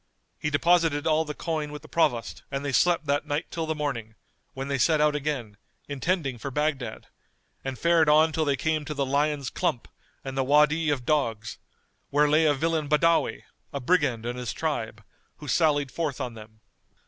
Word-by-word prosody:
He 150 - -1
deposited 160 -1 +2
all 160 0 +2
the 150 -1 -6
coin 155 -3 -3
with 150 -1 -8
the - - -12
Provost 140 -8 0
and 140 +1 -4
they 140 - -1
slept 170 +3 +3
that 145 0 0
night 145 +3 -2
till 165 -1 -3
the 160 - -1
morning, 120 -7 -4 0.4
when 135 +1 -4
they 140 -1 -1
set 155 +6 +3
out 150 0 +3
again, 135 -8 -3 0.3
intending 145 -2 -1
for 140 - -4
Baghdad, 140 -5 -2 0.6
and 135 -1 -4
fared 170 0 +3
on 155 +2 +5
till 155 +1 0
they 145 -2 +1
came 155 +1 -1
to 150 - -5
the 140 -1 0
Lion's 140 -1 0
Clump 120 - -1 0.4
and 135 0 -6
the 135 - +1
Wady 150 +3 +3
of 135 -4 -1
Dogs, 115 -8 -1 0.5
where 150 +1 +3
lay 155 +2 +4
a 145 - +3
villain 160 0 -1
Badawi, 165 +2 +2 0.3
a 140 - -3
brigand 130 -5 +1
and 120 +1 -3
his 120 -3 -4
tribe, 115 -9 -3 0.3
who 150 - -11
sallied 145 -2 +2
forth 155 -5 -3
on 125 -3 -4
them. 110 0 -13
145 Hz, 190 wpm, -26 LUFS, 130-155 Hz, 0.6 s, on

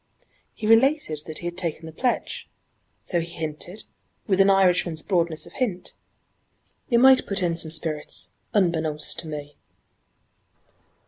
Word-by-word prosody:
He - - -6
related 225 - +3
that 155 -1 -6
he - - -8
had 175 0 -4
taken 170 -3 -3
the 160 - -8
pledge, 245 +10 -2 0.5
so 175 - -1
he 170 0 -5
hinted, 160 +5 -3 0.4
with 195 -2 +3
an 195 - +5
Irishman's 180 -4 +2
broadness 170 -4 0
of - - -13
hint, 210 -9 -2 1.0
'you 240 - +3
might 260 +2 +6
put 200 -1 -1
in 170 -1 0
some 165 -1 0
spirits 155 - +2 0.2
unbeknownst 160 -6 0
to 165 - -2
me!'" 145 -1 -7
170 Hz, 140 wpm, -24 LUFS, 160-200 Hz, 1.0 s, might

